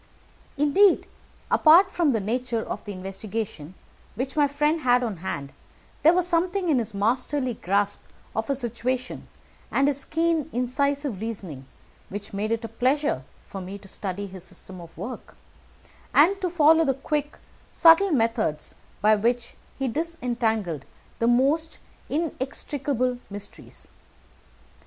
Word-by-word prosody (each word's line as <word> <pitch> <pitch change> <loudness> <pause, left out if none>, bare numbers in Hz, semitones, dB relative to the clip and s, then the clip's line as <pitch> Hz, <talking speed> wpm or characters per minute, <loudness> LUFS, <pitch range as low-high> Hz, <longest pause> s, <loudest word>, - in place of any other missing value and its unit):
Indeed, 345 +8 +4 0.5
apart 350 +5 +6
from 335 -6 +2
the 225 - +1
nature 230 +2 -1
of - - -5
the 205 - -5
investigation 195 -3 -5 0.4
which 260 +4 -3
my 295 -2 +4
friend 300 +3 +1
had 250 -2 +3
on 220 -6 -3
hand, 145 -6 -5 0.5
there 325 +3 +6
was 360 -1 +2
something 360 +1 +1
in 280 -5 +4
his 220 -3 -4
masterly 250 +5 0
grasp 200 +1 0 0.4
of 220 +3 -2
a 275 - +2
situation, 250 0 -3 0.4
and 275 - +2
his 285 -1 0
keen, 325 -2 0
incisive 265 -2 -1
reasoning, 185 - -6 0.4
which 205 +1 -7
made 210 +2 -2
it 230 0 -1
a - - -3
pleasure 255 - +1 0.3
to 195 - -5
me 190 +2 -7
to 200 - -15
study 195 +1 -4
his 190 -2 -9
system 185 0 -8
of 165 -1 -13
work, 250 +3 -7 0.8
and 380 +7 +5
to 365 - 0
follow 325 -1 +5
the 270 -4 +1
quick 295 +1 -2 0.3
subtle 335 +4 +6
methods 225 - 0 0.3
by 215 +1 +6
which 235 +3 0 0.2
he 270 - -1
disentangled 235 - -1 0.4
the 230 - +2
most 280 +7 +2 0.3
inextricable 275 -4 -1
mysteries. 205 0 -9
250 Hz, 140 wpm, -25 LUFS, 205-295 Hz, 0.8 s, apart